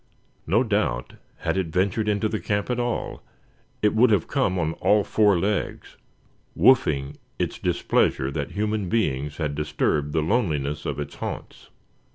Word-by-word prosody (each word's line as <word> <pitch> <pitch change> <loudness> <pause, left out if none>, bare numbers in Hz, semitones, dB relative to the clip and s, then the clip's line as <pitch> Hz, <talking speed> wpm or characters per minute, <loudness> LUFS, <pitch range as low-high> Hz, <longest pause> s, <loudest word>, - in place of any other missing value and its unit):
No 105 +9 +3
doubt, 75 - -1 0.3
had - - -1
it 95 -3 0
ventured 100 +5 0
into 105 +1 +1
the 110 0 -2
camp 100 +3 -1
at 125 - -1
all, 120 -1 -2 0.6
it 105 - +4
would 115 +3 +5
have 100 -6 +2
come 125 -10 0
on 80 -2 0
all 105 0 +4
four 105 -3 +3
legs, 100 +4 -2 0.6
"woofing" 70 - +3 0.2
its - - -2
displeasure 65 - +1
that - - -3
human 105 -2 -1
beings 75 -10 -1
had 75 -3 -2
disturbed 75 0 -1
the 80 0 +1
loneliness 75 - 0
of - - -3
its 75 - -5
haunts. - - -7
100 Hz, 155 wpm, -24 LUFS, 75-110 Hz, 0.6 s, would